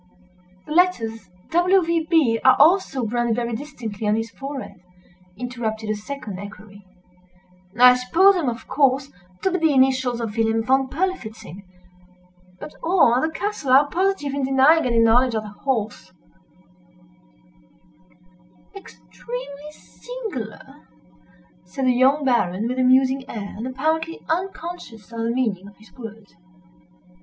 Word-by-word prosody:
"The -, -, -11 dB
letters 225 Hz, -, +1 dB, 0.2 s
W. 360 Hz, +3 st, +3 dB
V. 330 Hz, -1 st, -1 dB
B. 280 Hz, -10 st, +3 dB
are 260 Hz, 0 st, +6 dB
also 295 Hz, -5 st, +3 dB
branded 235 Hz, 0 st, 0 dB
very 235 Hz, 0 st, -3 dB
distinctly 225 Hz, -6 st, -6 dB
on 210 Hz, -, +2 dB
his 225 Hz, +1 st, -3 dB
forehead," 270 Hz, -9 st, -8 dB, 0.6 s
interrupted 225 Hz, -3 st, -4 dB
a -, -, -1 dB
second 210 Hz, -3 st, -7 dB
equerry, 205 Hz, 0 st, -11 dB, 1.0 s
"I 250 Hz, 0 st, +9 dB
supposed 340 Hz, +11 st, +4 dB
them, 325 Hz, -8 st, 0 dB
of 235 Hz, +1 st, -7 dB
course, 275 Hz, -1 st, +1 dB, 0.3 s
to 380 Hz, -, +1 dB
be 365 Hz, -, -1 dB
the 320 Hz, -2 st, +2 dB
initials 260 Hz, -2 st, +2 dB
of 225 Hz, -3 st, -4 dB
Wilhelm 225 Hz, 0 st, +1 dB
Von 265 Hz, +2 st, +2 dB
Berlifitzing—but 185 Hz, -, -8 dB
all 330 Hz, -8 st, +3 dB
at 250 Hz, -, +2 dB
the 315 Hz, -, 0 dB
castle 320 Hz, -5 st, -3 dB
are 280 Hz, +2 st, +6 dB
positive 365 Hz, -6 st, 0 dB
in 280 Hz, -, -2 dB
denying 270 Hz, +4 st, +4 dB
any 235 Hz, -1 st, 0 dB
knowledge 230 Hz, +2 st, +4 dB
of 215 Hz, -, -2 dB
the 210 Hz, -, -8 dB
horse." 220 Hz, 0 st, -4 dB, 2.6 s
"Extremely 250 Hz, -, -9 dB
singular!" 385 Hz, -, -9 dB, 0.8 s
said 270 Hz, -, -4 dB
the 255 Hz, -, +4 dB
young 270 Hz, +4 st, +3 dB
Baron, 220 Hz, -5 st, +1 dB
with 255 Hz, +1 st, -3 dB
a -, -, +3 dB
musing 260 Hz, +1 st, +3 dB
air, 200 Hz, -3 st, -6 dB
and 230 Hz, +4 st, -5 dB
apparently 315 Hz, +5 st, -2 dB
unconscious 335 Hz, -, -5 dB
of 230 Hz, -, -7 dB
the 230 Hz, 0 st, -1 dB
meaning 220 Hz, -6 st, -1 dB
of 200 Hz, -, -16 dB
his 215 Hz, -, -20 dB
words. 225 Hz, -4 st, -11 dB
250 Hz, 135 wpm, -22 LUFS, 220-295 Hz, 2.6 s, I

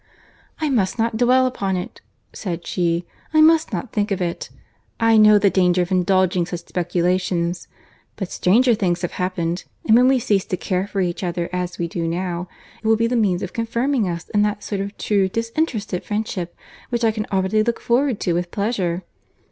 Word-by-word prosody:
"I 310 Hz, -, 0 dB
must 205 Hz, -8 st, +1 dB
not 230 Hz, 0 st, 0 dB
dwell 250 Hz, +3 st, +4 dB
upon 195 Hz, -7 st, -1 dB
it," 180 Hz, -, -7 dB, 0.3 s
said 175 Hz, -5 st, -5 dB
she.—"I 175 Hz, -, -1 dB
must 320 Hz, 0 st, +5 dB
not 255 Hz, -, -4 dB
think 210 Hz, -1 st, 0 dB
of 195 Hz, -, -1 dB
it. 175 Hz, -2 st, -3 dB, 0.5 s
I 225 Hz, -1 st, +4 dB
know 215 Hz, -1 st, +7 dB
the 200 Hz, -1 st, +3 dB
danger 180 Hz, -1 st, +3 dB
of 175 Hz, -, -7 dB
indulging 185 Hz, -1 st, +2 dB
such 175 Hz, -1 st, -5 dB
speculations. 175 Hz, 0 st, -1 dB, 0.5 s
But 195 Hz, -4 st, -5 dB
stranger 240 Hz, +7 st, +3 dB
things 180 Hz, -5 st, 0 dB
have 175 Hz, -, -1 dB
happened; 175 Hz, -1 st, -2 dB, 0.2 s
and 220 Hz, -, +5 dB
when 250 Hz, +2 st, +6 dB
we 265 Hz, 0 st, +4 dB
cease 205 Hz, -5 st, +1 dB
to 185 Hz, -, -3 dB
care 185 Hz, +1 st, -1 dB
for 200 Hz, -1 st, -2 dB
each 175 Hz, +1 st, -2 dB
other 175 Hz, -1 st, -2 dB
as 180 Hz, 0 st, -3 dB
we 170 Hz, -, -2 dB
do 165 Hz, 0 st, -3 dB
now, 175 Hz, +1 st, -3 dB, 0.4 s
it -, -, -2 dB
will 225 Hz, 0 st, +4 dB
be 230 Hz, -, +1 dB
the 240 Hz, +2 st, 0 dB
means 195 Hz, -6 st, +1 dB
of 180 Hz, -, -5 dB
confirming 235 Hz, -1 st, 0 dB
us 170 Hz, 0 st, -5 dB
in 205 Hz, -, +2 dB
that 210 Hz, 0 st, 0 dB
sort 200 Hz, -2 st, -3 dB
of 200 Hz, +1 st, -6 dB
true 200 Hz, -3 st, +1 dB
disinterested 230 Hz, -, -2 dB
friendship 205 Hz, -5 st, -3 dB, 0.3 s
which 240 Hz, -1 st, -1 dB
I 225 Hz, -, +4 dB
can 215 Hz, -1 st, -4 dB
already 190 Hz, +2 st, +2 dB
look 235 Hz, +2 st, -1 dB
forward 245 Hz, -1 st, +1 dB
to 175 Hz, -, +1 dB
with 175 Hz, +1 st, -1 dB
pleasure." 190 Hz, -4 st, -1 dB
195 Hz, 195 wpm, -21 LUFS, 180-225 Hz, 0.5 s, know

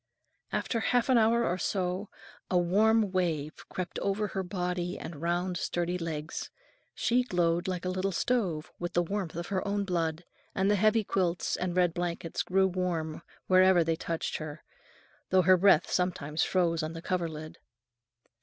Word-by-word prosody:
After 230 Hz, -, -1 dB
half 245 Hz, +2 st, +1 dB
an 250 Hz, -2 st, +6 dB
hour 230 Hz, +1 st, +3 dB
or 180 Hz, -2 st, -1 dB
so, 185 Hz, +3 st, -1 dB, 0.4 s
a 180 Hz, -, +2 dB
warm 210 Hz, +4 st, +3 dB
wave 160 Hz, -5 st, 0 dB, 0.2 s
crept 180 Hz, -2 st, -4 dB
over 205 Hz, +1 st, -1 dB
her 190 Hz, -, -2 dB
body 180 Hz, -1 st, -3 dB
and 160 Hz, -3 st, -8 dB
round, 175 Hz, +2 st, 0 dB
sturdy 175 Hz, +1 st, -1 dB
legs; 155 Hz, -2 st, -4 dB, 0.5 s
she 245 Hz, +2 st, +2 dB
glowed 175 Hz, -7 st, 0 dB
like 180 Hz, -1 st, -3 dB
a -, -, 0 dB
little 185 Hz, +1 st, -1 dB
stove 185 Hz, -6 st, -1 dB
with 175 Hz, 0 st, -4 dB
the 175 Hz, -, +3 dB
warmth 190 Hz, -2 st, -3 dB
of 170 Hz, +1 st, -5 dB
her 190 Hz, -2 st, -1 dB
own 200 Hz, 0 st, 0 dB
blood, 165 Hz, -2 st, -1 dB, 0.3 s
and 195 Hz, +2 st, +2 dB
the -, -, +4 dB
heavy 215 Hz, +2 st, +3 dB
quilts 180 Hz, -3 st, 0 dB
and 180 Hz, -1 st, -2 dB
red 175 Hz, -2 st, +3 dB
blankets 170 Hz, -1 st, -3 dB
grew 190 Hz, +1 st, +2 dB
warm 175 Hz, -4 st, -2 dB, 0.2 s
wherever 185 Hz, -1 st, +5 dB
they 165 Hz, 0 st, 0 dB
touched 165 Hz, 0 st, -3 dB
her, 155 Hz, -1 st, -7 dB, 0.7 s
though 185 Hz, 0 st, +4 dB
her 185 Hz, +2 st, +7 dB
breath 195 Hz, +2 st, +4 dB
sometimes 165 Hz, -4 st, -1 dB
froze 170 Hz, -3 st, +2 dB
on 155 Hz, +1 st, -4 dB
the 165 Hz, 0 st, -8 dB
coverlid. 160 Hz, -4 st, -3 dB
180 Hz, 165 wpm, -29 LUFS, 170-195 Hz, 0.7 s, her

